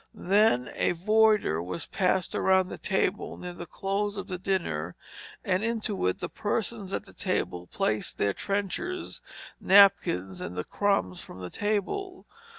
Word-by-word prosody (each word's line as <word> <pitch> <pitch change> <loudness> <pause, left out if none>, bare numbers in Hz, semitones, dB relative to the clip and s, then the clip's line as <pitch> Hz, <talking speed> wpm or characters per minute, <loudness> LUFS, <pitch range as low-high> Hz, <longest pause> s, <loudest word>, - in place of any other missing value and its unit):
Then 195 - +3
a - - +1
voider 210 - +3
was 90 -1 -4
passed 185 -1 0
around 190 -1 +3
the - - -7
table 190 0 -1
near 180 0 -7
the 175 0 -8
close 200 +3 -2
of - - -4
the 180 -1 -4
dinner, 90 - -2 0.5
and 185 +2 +1
into 220 - -1
it 90 - -1
the - - -2
persons 210 -1 -3
at 200 - -3
the - - -16
table 90 - -2
placed 105 +4 -1
their 100 -1 +1
trenchers, 205 - -3 0.4
napkins, 140 - +4
and 90 +1 -6
the 90 - -1
crumbs 195 - 0
from - - -11
the 90 -1 -7
table. 290 - -2
190 Hz, 155 wpm, -28 LUFS, -, 0.5 s, napkins